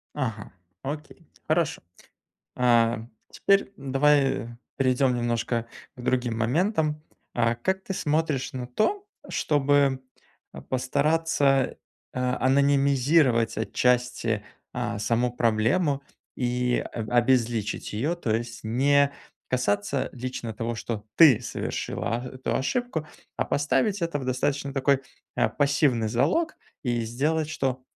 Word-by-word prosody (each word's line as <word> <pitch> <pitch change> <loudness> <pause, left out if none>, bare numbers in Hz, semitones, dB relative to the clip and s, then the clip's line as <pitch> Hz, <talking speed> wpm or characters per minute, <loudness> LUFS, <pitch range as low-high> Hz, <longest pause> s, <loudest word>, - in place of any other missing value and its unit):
Ага. 110 -7 -4 0.3
Окей. 150 +4 -7 0.2
Хорошо. 160 0 +1 0.7
А, 120 -2 +3 0.3
теперь 200 0 +2
давай 135 -2 +2 0.3
перейдем 130 -1 +2
немножко 120 -1 -1 0.3
к 125 - -9
другим 125 -2 0
моментам, 155 - +1 0.3
а 115 -1 +2
как 190 +11 -1
ты 190 - -4
смотришь 150 -4 0
на 125 -1 -5
то, 385 - 0 0.2
чтобы, 140 -2 +2 0.5
э, - - -9
постараться, 140 +1 +1 0.4
э, - - -5
анонимизировать 135 -1 +3
отчасти, 120 -2 0 0.3
а, 120 -3 -3
саму 115 +4 +1
проблему, 125 +6 +1 0.3
и 125 0 0
аб 110 -2 -5
обезличить 120 -3 +1
ее, 140 +12 -1
то 115 -10 -1
есть 115 0 -4
не 140 +5 +3 0.4
касаться 125 +1 0
лично 125 -2 -5
того, 115 +2 -3
что 110 -1 -5
ты 150 -9 +7
совершила 115 0 -3
а 120 - -6
эту 130 - -1
ошибку, 165 - -2 0.3
а - - 0
поставить 190 +8 +1
это 165 -3 -1
в, 130 - -6
достаточно, 140 +2 -1
такой, 135 0 +2 0.4
э, - - +3
пассивный 140 -5 +2
залог, 310 - +1 0.3
и 120 -4 0
сделать, 150 +7 -1
что 130 -4 -2
130 Hz, 115 wpm, -26 LUFS, 120-145 Hz, 0.7 s, ты